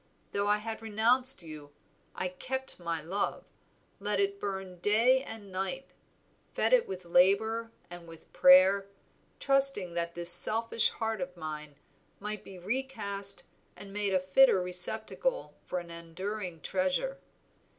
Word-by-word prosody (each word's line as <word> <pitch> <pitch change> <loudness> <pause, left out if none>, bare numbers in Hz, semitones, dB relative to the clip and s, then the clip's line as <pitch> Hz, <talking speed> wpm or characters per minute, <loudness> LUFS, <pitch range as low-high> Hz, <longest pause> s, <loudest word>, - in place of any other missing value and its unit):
Though 200 0 -1
I 210 0 +3
had 220 +1 -6
renounced 230 +2 +2
you, 150 -3 -11 0.4
I 185 - -2
kept 260 +8 -3
my 170 -2 -4
love; 190 +5 -3 0.5
let - - -1
it 400 0 -1
burn 190 - -6
day 230 +7 +3
and 225 -7 -10
night, 195 +9 -4 0.6
fed - - +1
it - - +4
with 185 -1 -7
labor 220 +6 +2 0.2
and 175 -1 -11
with 165 -1 -15
prayer, 190 +2 +6 0.5
trusting 275 -10 +2
that 170 0 -3
this 175 0 +4
selfish 225 +5 +4
heart 225 -3 -4
of 180 0 -6
mine 150 -2 -7 0.4
might 210 0 -5
be 190 - -12
recast 200 -2 -4 0.3
and 195 0 -11
made 205 -2 -1
a - - +3
fitter 190 +5 +4
receptacle 220 - +1
for 180 - -3
an 175 -1 -7
enduring 170 +1 -6
treasure. 390 - -2
200 Hz, 140 wpm, -29 LUFS, 180-230 Hz, 0.6 s, prayer